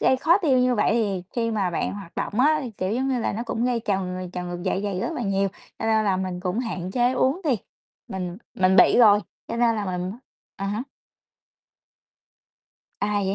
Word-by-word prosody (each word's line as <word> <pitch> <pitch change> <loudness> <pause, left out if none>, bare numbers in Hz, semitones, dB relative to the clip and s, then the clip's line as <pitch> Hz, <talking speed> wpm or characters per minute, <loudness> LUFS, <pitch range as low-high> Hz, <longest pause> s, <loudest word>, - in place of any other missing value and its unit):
gây 260 - +4
khó 335 +8 +4
tiêu 280 -9 +3
như 250 0 +3
vậy 210 - +2
thì 200 -6 0
khi 230 -1 +1
mà 200 -5 0
bạn 170 - -2
hoạt 195 -4 -9
động 215 - -1
á 305 +3 +4
thì, 245 - -5
kiểu, 190 -1 -3
giống 260 +3 0
như 260 -2 +1
là, - - -1
nó 225 +3 -3
cũng 235 0 -2
gây 245 -2 +1
trào 195 -2 0
ng 180 0 -5
trào 180 -1 -5
ngược 175 0 -5
dạ 190 - 0
dày 200 -3 -2
rất 330 - -2
là 250 - -3
nhiều, 195 -1 +1 0.3
cho - - -4
nên 220 -1 +3
là 195 -2 +2
mình 185 -1 -3
cũng 185 +3 -2
hạn 190 -7 -3
chế 245 +4 +2
uống 265 +7 +1
đi, 265 -6 +2 0.5
mình 180 -2 -4 0.2
mình 190 0 +3
bị - - +6
rồi, 210 -4 +7 0.3
cho - - -3
nên 235 -1 +3
là 210 - -2
mình 180 0 -3 0.4
à 195 - -3
há. 210 +4 -2 2.2
À, 210 - 0
vậy 190 - 0
205 Hz, 225 wpm, -24 LUFS, 185-245 Hz, 2.2 s, rồi